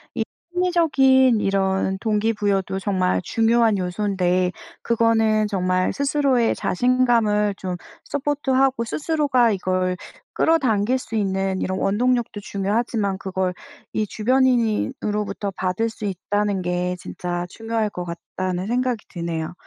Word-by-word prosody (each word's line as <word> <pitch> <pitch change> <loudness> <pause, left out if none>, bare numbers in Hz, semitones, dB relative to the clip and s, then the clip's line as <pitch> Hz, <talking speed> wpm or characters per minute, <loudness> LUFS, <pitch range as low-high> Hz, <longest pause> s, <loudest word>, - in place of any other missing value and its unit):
이 - - 0 0.3
심리적인 275 -9 +4
이런 190 -1 0
동기부여도 205 -3 0
정말 185 -2 0
중요한 225 +1 +2
요소인데 185 -1 0 0.3
그거는 225 -2 +2
정말 185 -2 0
스스로의 275 -4 +2
자신감을 230 -3 +2
좀 185 -2 -4 0.3
서포트하고 270 -3 0
스스로가 280 -2 +1
이걸 185 -1 0 0.4
끌어당길 255 -7 +2
수 230 -3 -7
있는 195 -2 0
이런 185 0 -2
원동력도 235 +1 0
중요하지만 200 0 -1
그걸 190 -1 -2 0.4
이 215 - 0
주변인이 240 +1 +2
으로부터 210 -1 -2
받을 190 +5 -1
수 220 - -11
있다는 200 +1 -1
게 180 0 -1
진짜 175 -1 -4
중요할 225 0 -2
것 180 -3 -5
같다는 180 +2 -4
생각이 245 -1 -1
드네요. 170 -3 -4
210 Hz, 295 characters per minute, -22 LUFS, 190-240 Hz, 0.4 s, 심리적인